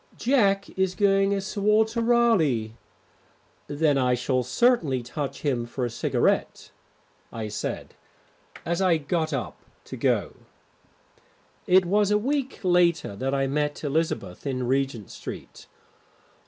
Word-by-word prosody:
"Jack 200 -6 +2
is 190 -1 -1
going 195 -1 +3
as 195 -1 -1
Sir 200 +1 -5
Walter 220 +3 +2
Raleigh." 220 - +2 1.0
"Then 145 -1 +1
I 125 -1 +2
shall 125 +1 0
certainly 145 - +1
touch 140 +4 -5
him 125 -5 -1
for 125 +1 -3
a 120 - -4
cigarette," 120 - -1 0.6
I 110 -2 -5
said, 105 0 -5 0.7
as 170 +2 -1
I 180 -3 +3
got 160 +2 -2
up 135 -4 -4 0.3
to - - -8
go. - - 0 1.3
It 185 0 +5
was 205 +3 +2
a 210 - +3
week 270 +3 -2
later 175 - +2
that 135 +5 -1
I 135 0 +1
met 145 +2 -2
Elizabeth 145 - -2
in 130 -2 -2
Regent 135 -5 -1
Street. - - -9
160 Hz, 130 wpm, -25 LUFS, 130-200 Hz, 1.3 s, It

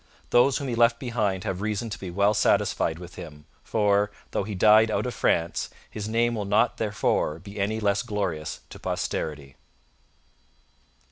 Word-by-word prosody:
Those 125 +2 +5
whom 140 - -4
he 125 - -2
left 115 0 +4
behind 105 -7 -1
have 95 0 -3
reason 110 +2 -2
to - - -5
be 95 - -6
well 100 +4 +2
satisfied 80 -5 +1
with 90 0 -11
him; 75 -2 -10 0.2
for, 105 -1 +2 0.2
though - - 0
he 105 0 -5
died 110 +3 +6
out 110 - 0
of 125 - -3
France, 85 0 0 0.2
his 105 0 -5
name 120 +1 +2
will 105 -3 -2
not 105 +2 +2
therefor 105 -7 0
be 100 +4 -10
any 105 +3 0
less 100 -2 +1
glorious 90 -8 -3
to - - -10
posterity. 75 -3 -4
105 Hz, 165 wpm, -26 LUFS, 90-110 Hz, 0.2 s, died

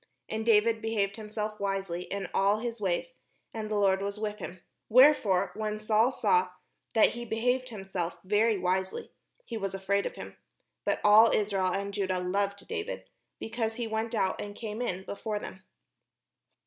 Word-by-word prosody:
And 220 0 -3
David 225 0 +4
behaved 210 -3 -1
himself 215 0 -4
wisely 195 -3 -2
in 195 -2 -4
all 200 +2 +3
his 230 0 -4
ways; 195 - -1 0.4
and 220 -1 -4
the 215 - -1
Lord 195 -2 +3
was 200 +1 -3
with 210 0 -3
him. 180 -1 -7 0.3
Wherefore 220 -7 +5
when 215 -1 -3
Saul 215 +3 +3
saw 450 +11 +2 0.5
that 220 - +6
he 240 - -6
behaved 245 +3 0
himself 190 -5 -4
very 210 +3 +3
wisely, 185 +1 -1 0.3
he 230 - -5
was 195 -2 -3
afraid 200 +1 0
of - - -8
him. - - -9 0.5
But - - 0
all 215 +2 +8
Israel 200 -3 +1
and 200 +2 -2
Judah 190 -2 0
loved 200 +2 -1
David, 435 -1 -5 0.3
because 225 0 -3
he 240 0 -3
went 225 +1 -2
out 190 -3 0
and 205 0 -7
came 220 +1 -5
in 190 -6 -2
before 210 +1 -3
them. 190 -2 -8
210 Hz, 165 wpm, -29 LUFS, 195-225 Hz, 0.5 s, all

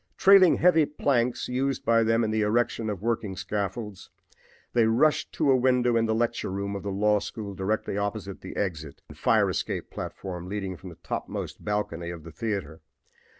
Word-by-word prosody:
Trailing 195 -2 +7
heavy 165 -4 +4
planks 125 -4 0
used 130 +1 -1
by 115 0 +4
them 115 +1 +2
in 110 - 0
the 110 0 +1
erection 115 +1 +1
of 100 -2 -5
working 110 -4 -1
scaffolds, 100 +1 -4 0.6
they 115 -2 +4
rushed 130 +7 +2
to 140 - +2
a - - +6
window 125 -1 +3
in 115 0 +2
the 110 - +1
lecture 120 -2 -1
room 100 +1 -3
of 100 - -4
the 100 - -4
law 105 +2 +2
school 100 -1 -6
directly 100 +1 -2
opposite 100 -1 -4
the - - -8
exit 80 -7 -4
and - - -11
fire - - +3
escape - - -3
platform 90 -2 -6
leading 95 -2 -3
from 95 +2 -10
the 85 - -11
topmost - - -5
balcony 105 -5 -2
of 85 -2 -7
the 85 - -10
theater. 95 -3 -4
105 Hz, 185 wpm, -27 LUFS, 95-120 Hz, 0.6 s, Trailing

